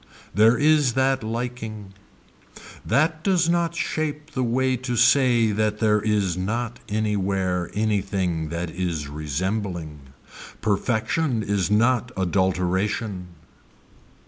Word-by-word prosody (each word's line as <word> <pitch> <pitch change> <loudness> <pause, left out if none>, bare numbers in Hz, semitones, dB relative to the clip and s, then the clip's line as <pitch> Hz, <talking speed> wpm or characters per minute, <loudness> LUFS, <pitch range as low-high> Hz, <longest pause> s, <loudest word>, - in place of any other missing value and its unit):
There 110 +5 +5
is 150 -4 +3
that 130 -1 +1
liking. 110 -3 -5 0.9
That 155 +2 +1
does 180 -4 +2
not 170 -1 +1
shape 155 -1 -3
the 130 -3 -1
way 130 +2 +1
to 125 0 -3
say 120 -2 +4
that 105 0 0
there 105 -1 +2
is 105 -4 0
not 115 +6 -3
anywhere 95 -4 -1
anything 95 -6 -1
that 85 +1 -4
is 85 -5 -3
resembling. 80 +2 -3 0.6
Perfection 110 - 0
is 100 -3 0
not 120 +3 +2
adulteration. 95 +1 0
110 Hz, 105 wpm, -24 LUFS, 95-125 Hz, 0.9 s, There